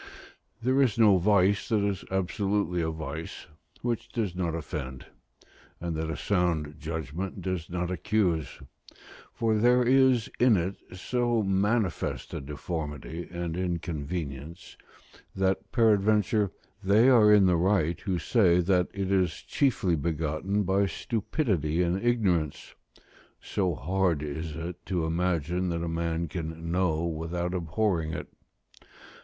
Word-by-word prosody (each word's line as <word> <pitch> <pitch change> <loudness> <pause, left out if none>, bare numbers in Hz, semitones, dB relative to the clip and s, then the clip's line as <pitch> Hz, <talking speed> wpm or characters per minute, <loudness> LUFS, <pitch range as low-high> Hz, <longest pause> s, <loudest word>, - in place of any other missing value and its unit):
There 130 +3 +3
is 125 -5 +2
no 105 -4 +6
vice 100 +1 +3
that 105 -3 +2
is 100 -3 -2
absolutely 95 -1 0
a 80 - 0
vice 80 0 -6 0.4
which 120 -1 -2
does 105 -7 -2
not 85 -3 -1
offend, 65 -4 -6 0.7
and 85 -1 -3
that 80 0 -2
a 80 - -3
sound 85 -6 0
judgment 80 +3 -4
does 90 -3 -3
not 90 0 -2
accuse; 90 -5 0 0.7
for 110 -2 0
there 125 +2 +4
is 130 -2 +4
in 120 -4 +5
it 90 +3 -2 0.2
so 120 +2 0
manifest 100 -1 0
a - - -4
deformity 75 +2 -5
and 85 -2 -4
inconvenience, 85 -3 -4 0.6
that 95 0 0
peradventure 105 -2 +3 0.3
they 105 +6 +5
are 115 -5 +6
in 105 -2 +6
the 90 -1 +4
right 85 -2 +1
who 95 -3 -1
say 90 -3 +3
that 90 0 +2
it 100 -1 -2
is 90 -4 +1
chiefly 115 -10 +1
begotten 80 +6 -1
by 95 +1 +2
stupidity 95 - -1
and 90 +4 -1
ignorance: 95 -11 0 0.7
so 90 -5 -1
hard 90 0 0
is 75 +1 -5
it 85 +2 -6
to 90 -4 0
imagine 90 +1 0
that 85 -1 -2
a - - -2
man 85 0 -1
can 80 0 -5
know 85 -3 +1
without 85 +2 -3
abhorring 85 -2 -1
it. - - -6
90 Hz, 130 wpm, -28 LUFS, 80-105 Hz, 0.7 s, no